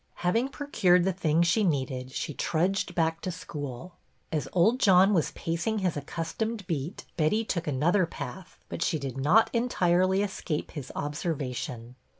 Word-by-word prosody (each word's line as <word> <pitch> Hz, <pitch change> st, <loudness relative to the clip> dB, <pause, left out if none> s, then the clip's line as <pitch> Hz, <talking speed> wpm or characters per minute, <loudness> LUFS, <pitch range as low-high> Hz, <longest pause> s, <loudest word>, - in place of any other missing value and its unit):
Having 230 Hz, +9 st, +2 dB
procured 195 Hz, -12 st, +2 dB
the 190 Hz, +1 st, +1 dB
things 170 Hz, -2 st, +2 dB
she 210 Hz, +6 st, +3 dB
needed 130 Hz, -6 st, -1 dB
she 150 Hz, -, -3 dB
trudged 180 Hz, +4 st, 0 dB
back 165 Hz, -1 st, +1 dB
to 185 Hz, -, -3 dB
school. 150 Hz, -1 st, -7 dB, 0.3 s
As 155 Hz, -3 st, -1 dB
old 215 Hz, +8 st, +3 dB
John 195 Hz, -2 st, +6 dB
was 165 Hz, -6 st, +2 dB
pacing 170 Hz, +7 st, -1 dB
his 185 Hz, -5 st, 0 dB
accustomed 175 Hz, +9 st, -3 dB
beat 160 Hz, +1 st, -4 dB
Betty 195 Hz, +8 st, +2 dB
took 170 Hz, -5 st, -2 dB
another 165 Hz, +7 st, +2 dB
path; 185 Hz, +1 st, -8 dB
but -, -, -6 dB
she 160 Hz, -, +1 dB
did 135 Hz, -4 st, -5 dB
not 180 Hz, +12 st, +4 dB
entirely 190 Hz, -5 st, +2 dB
escape 175 Hz, -6 st, -3 dB
his 140 Hz, -5 st, -7 dB
observation. 130 Hz, -6 st, -4 dB
170 Hz, 155 wpm, -28 LUFS, 150-190 Hz, 0.3 s, John